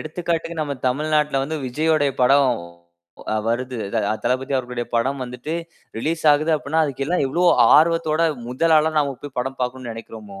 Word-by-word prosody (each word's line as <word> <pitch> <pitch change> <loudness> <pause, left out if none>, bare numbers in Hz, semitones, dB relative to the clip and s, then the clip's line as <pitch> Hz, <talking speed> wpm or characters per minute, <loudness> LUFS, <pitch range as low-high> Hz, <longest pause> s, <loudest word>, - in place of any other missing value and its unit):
எடுத்துக்காட்டுக்கு 165 0 -3
நம்ம 145 -2 -2
தமிழ்நாட்ல 150 +1 +1
வந்து 160 +2 -4
விஜய்யோடய 150 +1 +1
படம் 135 +2 +5 0.9
அ - - 0
வருது. 125 +1 -2
அத, 115 - -4
அ - - +2
தளபதி 130 +2 -1
அவர்களுடைய 125 -1 -3
படம் 130 +4 0
வந்துட்டு 125 +6 -6 0.4
ரிலீஸ் 160 +7 -2
ஆகுது 155 +3 +1
அப்பிடின்னா, 155 +1 0
அதுக்கெல்லாம் 140 +3 -1
எவ்ளோ 170 +7 -1 0.3
ஆர்வத்தோட, 165 0 +2 0.3
முதல் 160 +6 +2
ஆளா 155 +1 +2
நாம 140 -2 0
போய் 145 -2 -9
படம் 135 +2 -3
பாக்கணுன்னு 125 -1 -4
நெனைக்கிறோமோ! 110 -3 -10
140 Hz, 155 wpm, -21 LUFS, 125-155 Hz, 0.9 s, படம்